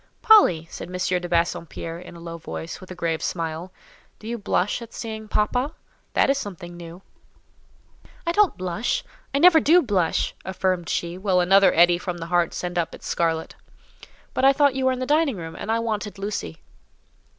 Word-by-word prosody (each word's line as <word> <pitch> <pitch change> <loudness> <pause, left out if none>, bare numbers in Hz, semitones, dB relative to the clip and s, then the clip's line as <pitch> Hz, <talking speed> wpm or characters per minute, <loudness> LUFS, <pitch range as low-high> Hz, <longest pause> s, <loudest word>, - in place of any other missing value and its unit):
"Polly," 290 - +6
said - - -7
M. 180 - -11 0.3
de 175 - -6
Bassompierre, 170 -1 -2
in 180 -1 -11
a - - -11
low 170 0 -7
voice, 80 - -7
with 185 - -12
a 185 - -7
grave 165 -2 -2
smile, 165 +1 -3 0.5
"do 215 - -11
you 235 - -2
blush 205 0 -1
at 235 -1 -10
seeing 220 -1 -6
papa? 245 +8 0 0.4
That - - +3
is 275 0 +2
something 175 -6 -7
new." 170 +2 -10 1.2
"I 335 - +1
don't 410 0 +3
blush—I 215 - -3
never 330 +2 +7
do 335 +4 +5
blush," 190 - 0
affirmed 185 -2 -1
she, 175 +1 -2
while 190 -2 +2
another 195 +2 +5
eddy 175 +1 +5
from 180 -1 -4
the 165 - -6
heart 175 -1 +3
sent 175 -1 -2
up 165 - -2
its - - -14
scarlet. 165 -1 -1 0.8
"But 255 - -1
I 270 +1 +7
thought 285 -1 +3
you 265 0 -1
were - - +4
in 255 - -2
the - - -1
dining 295 -4 +2
room, 165 -1 -7
and 220 - -4
I 225 - +2
wanted 215 -3 -3
Lucy." 195 - -5
185 Hz, 185 wpm, -24 LUFS, 170-235 Hz, 1.2 s, never